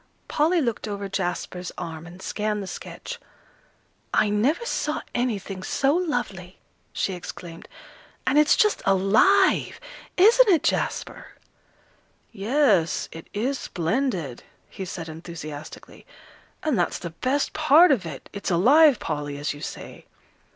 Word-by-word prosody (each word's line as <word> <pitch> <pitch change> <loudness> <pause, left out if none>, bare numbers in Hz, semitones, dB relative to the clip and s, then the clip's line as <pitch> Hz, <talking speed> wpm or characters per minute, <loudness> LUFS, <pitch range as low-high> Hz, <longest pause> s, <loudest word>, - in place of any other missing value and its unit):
Polly 325 +3 +2
looked 235 -5 -2
over 200 -1 -4
Jasper's 180 -1 -3
arm, 165 -1 -6
and 180 +2 -12
scanned 210 -1 -2
the - - -6
sketch. - - -8 0.9
"I 210 - +2
never 265 - +1
saw 300 -9 -2
anything 205 -6 -2
so 275 +8 +1
lovely!" 240 - -2 0.3
she 195 - -1
exclaimed. 175 -1 -9 0.6
"And 275 +3 +4
it's 300 0 +5
just 425 -1 +3
alive! 210 - +3 0.4
Isn't 450 +5 +6
it, 335 -5 +4
Jasper?" - - -2 1.0
"Yes, 210 - +1
it 165 - -10
is 250 +6 -1
splendid," 175 - -2 0.3
he 190 - -6
said 170 -2 -6
enthusiastically; 155 -2 -9 0.6
"and 305 -7 +1
that's - - 0
the 170 - -7
best 260 - -1
part 310 +2 +6
of 240 -9 +2
it 155 -5 -8
it's 200 - -4
alive, 265 - +6
Polly, 145 -5 -4
as 145 +1 -2
you 145 - -11
say." - - -8
205 Hz, 130 wpm, -24 LUFS, 175-285 Hz, 1.0 s, Isn't